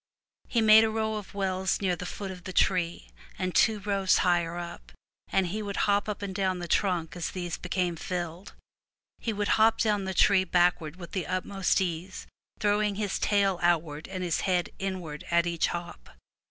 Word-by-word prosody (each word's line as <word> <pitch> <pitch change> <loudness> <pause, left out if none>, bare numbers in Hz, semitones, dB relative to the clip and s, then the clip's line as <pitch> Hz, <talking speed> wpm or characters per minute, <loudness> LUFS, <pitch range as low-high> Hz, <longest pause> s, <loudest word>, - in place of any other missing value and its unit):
He 235 - +1
made 220 0 +8
a 220 - +2
row 220 0 -1
of 205 -1 -9
wells 190 -1 0
near 185 -3 +1
the 180 +1 -6
foot 195 0 -5
of 180 -1 -10
the 185 - -6
tree, 170 - +1 0.3
and 185 -1 -3
other 220 -1 -2
rows 195 -2 +2
higher 175 -1 +1
up, 170 - -8 0.4
and 190 - +2
he 205 +5 -3
would 200 -1 -4
hop 205 0 +1
up 205 -1 -4
and 195 -1 -4
down 185 -1 0
the 175 -1 -5
trunk 170 -4 0
as 175 - -3
these 175 -2 -4
became 180 -1 -2
filled. 175 +2 -5 0.7
He 230 - -2
would 205 -1 -2
hop 225 +1 +5
down 210 -3 +1
the 190 0 -3
tree 190 0 +5
backward 175 -3 +1
with 175 -2 -10
the 185 -4 -3
utmost 185 0 0
ease, 180 +1 -4 0.3
throwing 210 0 +1
his 205 -1 -2
tail 195 -3 +2
outward 165 -3 0
and 185 -1 -5
his 175 -3 0
head 180 -3 0
inward 180 -6 -4
at 170 0 +3
each 170 -1 0
hop. 170 - -6
185 Hz, 190 wpm, -28 LUFS, 175-200 Hz, 0.7 s, made